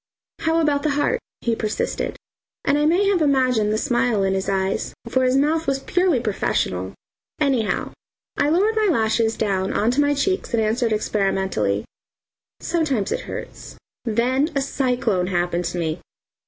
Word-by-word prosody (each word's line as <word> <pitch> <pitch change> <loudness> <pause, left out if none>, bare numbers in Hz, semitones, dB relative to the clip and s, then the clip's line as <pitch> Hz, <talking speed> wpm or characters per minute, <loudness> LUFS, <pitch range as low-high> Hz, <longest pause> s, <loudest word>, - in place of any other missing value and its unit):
"How 325 +1 +1
about 295 -3 +2
the 305 - 0
heart?" 375 +12 +1 0.2
he 230 -1 0
persisted, 215 -1 -2 0.5
and 280 - +3
I 295 - +3
may 355 +5 +3
have 375 -4 +2
imagined 255 -7 +2
the 215 - +1
smile 240 -4 +1
in 190 0 +1
his 190 0 -1
eyes, 190 0 -1
for 260 +2 +1
his 255 +1 +3
mouth 315 +3 +1
was 275 -1 +2
purely 355 +1 +1
professional. 95 - -1 0.4
Anyhow, 265 -8 0 0.4
I 285 - +1
lowered 400 +8 +2
my 435 -1 +2
lashes 225 -3 +1
down 195 -3 0
on 220 +3 +2
to 275 +4 +2
my 290 0 +2
cheeks 375 -2 0
and 225 - +2
answered 225 +2 0
experimentally: 190 - 0 0.8
"Sometimes 280 - 0
it - - 0
hurts." - - -8 0.3
Then 250 +6 +1
a 275 - +2
cyclone 245 -9 0
happened 175 -1 -1
to 175 +1 -3
me. 160 -1 -2
240 Hz, 160 wpm, -22 LUFS, 200-290 Hz, 0.8 s, and